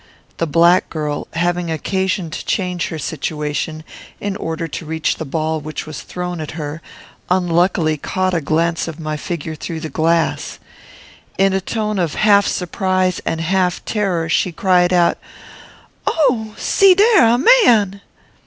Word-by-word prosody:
The 165 - -1
black 170 +4 +4
girl, 150 -2 -3
having 175 0 -1
occasion 185 +1 -1
to - - -5
change 180 -3 -1
her 160 - -5
situation, 155 +1 -3 0.4
in 200 -1 -3
order 165 -2 -4
to 165 - -6
reach 160 0 -1
the 160 - -5
ball 155 +2 -2
which 155 +1 -6
was 155 -1 -7
thrown 180 -2 -5
at 155 +1 -7
her, 150 +1 -5 0.5
unluckily 175 -3 +2
caught 185 +5 -1
a 170 - +1
glance 165 +3 0
of 165 -1 -7
my 155 -1 -3
figure 160 +1 -5
through 160 +1 -6
the 160 - -5
glass. 165 +1 0 0.8
In 195 0 +3
a 190 - 0
tone 215 0 -2
of 170 -4 -1
half 205 -2 +4
surprise 185 0 0
and 165 - -1
half 180 +1 0
terror, 190 -6 -1
she 175 +2 +1
cried 180 0 +2
out, 175 -1 +3 0.9
"Oh! 245 -9 +1
see 390 -2 +4
dare! 410 - +5
a 235 +1 +4 0.3
man!" 200 -4 +3
175 Hz, 155 wpm, -18 LUFS, 160-190 Hz, 0.9 s, dare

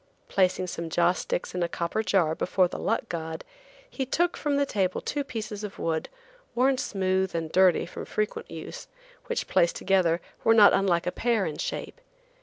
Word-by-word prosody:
Placing 185 -1 +2
some 170 -2 -5
joss 170 +1 +2
sticks - - -3
in 180 - -2
a 170 - 0
copper 170 +6 -1
jar 185 -6 +2
before 180 +2 +2
the - - -7
luck 230 +1 -1
god, 160 -3 -5 0.4
he 285 - -4
took 345 +7 +1
from 290 -2 0
the 285 - +2
table 190 -8 0
two 290 - -2
pieces 215 -5 -6
of 205 -1 -6
wood, 160 -1 -2 0.5
worn 260 +2 +3
smooth 190 -3 0
and 165 -1 -2
dirty 185 -1 +4
from - - -8
frequent 455 +2 -3
use, - - -8 0.4
which, - - -2
placed 170 - +3
together, 180 -3 +2 0.2
were 225 - +5
not 210 -2 +8
unlike 185 -3 +2
a 180 - 0
pear 230 -3 +1
in 155 - -4
shape. - - -4
190 Hz, 185 wpm, -27 LUFS, 170-230 Hz, 0.5 s, not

